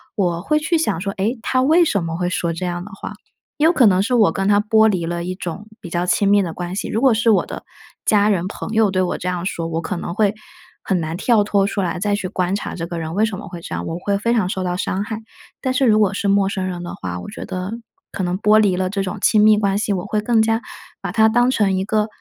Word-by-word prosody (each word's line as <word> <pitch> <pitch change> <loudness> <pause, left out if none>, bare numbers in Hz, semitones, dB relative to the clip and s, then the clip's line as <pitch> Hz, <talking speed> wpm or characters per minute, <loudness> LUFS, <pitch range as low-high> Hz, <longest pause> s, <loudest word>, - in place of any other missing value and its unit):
我 175 -5 0
会 305 - +1
去 320 +2 +1
想 235 - 0
说 195 +2 -3
“诶？ 215 +7 -1
他 255 +3 +1
为 320 +6 +4
什 200 - 0
么 165 0 -3
会 180 - -1
说 175 -1 -1
这 180 +2 -4
样 175 0 -3
的 205 - -10
话”， 195 - -7 0.4
也 300 - +2
有 330 - +6
可 270 -8 +4
能 190 -3 +4
是 245 +5 0
我 210 -8 +4
跟 195 +2 -1
他 205 0 +4
剥 220 +1 +4
离 180 -5 -1
了 170 0 -3
一 180 +1 -4
种 190 +3 -6
比 175 - -9
较 175 +1 -1
亲 200 +3 +2
密 205 0 +5
的 170 -3 -4
关 175 +1 -5
系， 200 - -3
如 220 - -1
果 265 -3 +5
是 230 +1 +2
我 205 - +4
的 - - -8 0.4
家 205 -1 +3
人、 185 -3 0
朋 - - -6
友 220 -2 +3
对 185 -1 -1
我 180 - -2
这 180 - -2
样 180 -1 -3
说， 165 -3 -3
我 165 0 -2
可 185 - -4
能 170 - -5
会 210 -2 +2 0.5
很 185 - 0
难 160 0 -3
跳 220 0 +3
脱 200 -1 +1
出 200 - -2
来 175 -1 -2
再 205 +2 +1
去 195 - -3
观 185 +1 -1
察 205 - -4
这 165 -1 -5
个 170 - -5
人 160 0 -5
为 210 +4 +2
什 215 -3 -4
么 210 - -9
会 175 -2 -8
这 - - -6
样， - - -4
我 165 - -4
会 200 +2 0
非 230 +3 0
常 210 -6 +1
受 190 -1 -2
到 180 -1 -1
伤 190 +2 -2
害。 220 0 -5 0.4
但 260 - 0
是 260 +1 +2
如 215 -3 +4
果 205 -2 +2
是 205 - -2
陌 200 0 +3
生 190 -1 -3
人 175 -1 -4
的 175 - -6
话， 90 -1 -5
我 90 - -8
觉 - - -7
得 185 +2 -4 0.4
可 190 - -3
能 180 0 -1
剥 210 0 +5
离 200 -4 +3
了 185 0 -1
这 195 +1 -2
种 190 +2 -4
亲 210 -1 +4
密 215 0 +6
关 200 -1 +1
系， 205 -1 0
我 185 +1 -3
会 210 +1 -1
更 225 +1 +2
加 225 +1 +1 0.4
把 - - -4
他 220 -1 +4
当 245 +2 +3
成 205 -6 +2
一 190 - 0
个 215 0 +1
200 Hz, 310 characters per minute, -20 LUFS, 180-215 Hz, 0.5 s, 有